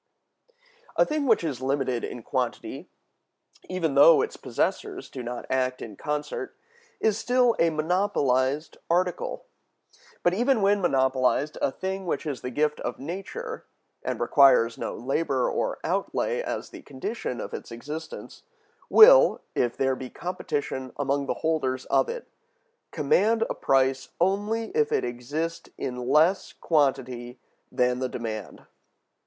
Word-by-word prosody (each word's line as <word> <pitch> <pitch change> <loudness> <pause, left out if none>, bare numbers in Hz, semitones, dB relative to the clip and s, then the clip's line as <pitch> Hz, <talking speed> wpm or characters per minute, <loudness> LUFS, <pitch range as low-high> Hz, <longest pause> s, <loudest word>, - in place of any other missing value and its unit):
A - - +4
thing 300 -2 -1
which 225 -6 +4
is 140 -6 -3
limited 130 -2 -1
in 120 - -6
quantity, - - -3 0.8
even 170 -5 -1
though 145 - +7
its 450 - -4
possessors 390 -3 -3
do 130 - -6
not 120 0 -5
act 130 -1 0
in 105 -3 -8
concert, 150 - -4 0.4
is 220 -1 +1
still 245 0 +3
a 165 - +4
monopolized 155 -4 0
article. 180 +1 -1 0.8
But 175 - +3
even 240 +2 +2
when 200 0 +3
monopolized, 130 -1 +1
a - - +2
thing 190 +2 -4
which - - -2
is 145 -4 -4
the 125 - -4
gift 150 +3 0
of 120 - -4
nature, 195 - -6 0.4
and - - -3
requires 125 -5 +5
no - - -4
labor 135 +1 0
or - - -1
outlay 485 -1 -1
as - - -5
the 350 -3 -10
condition 140 - -5
of - - -6
its - - -7
existence, 150 +7 -8 0.5
will, - - +8
if 120 -1 0
there 135 -1 +1
be 130 0 -7
competition 145 -7 -4
among 140 0 0
the - - -1
holders 130 -5 0
of 485 - +3
it, 475 0 -6 0.6
command 215 +10 +2
a - - -2
price 135 0 +1
only 205 +5 0
if 450 +1 +1
it - - +1
exist 145 +8 -4
in 125 0 -4
less 160 +7 +3
quantity 130 -5 0 0.3
than 125 0 +1
the 130 0 -1
demand. 110 -5 -6
150 Hz, 140 wpm, -26 LUFS, 130-195 Hz, 0.8 s, will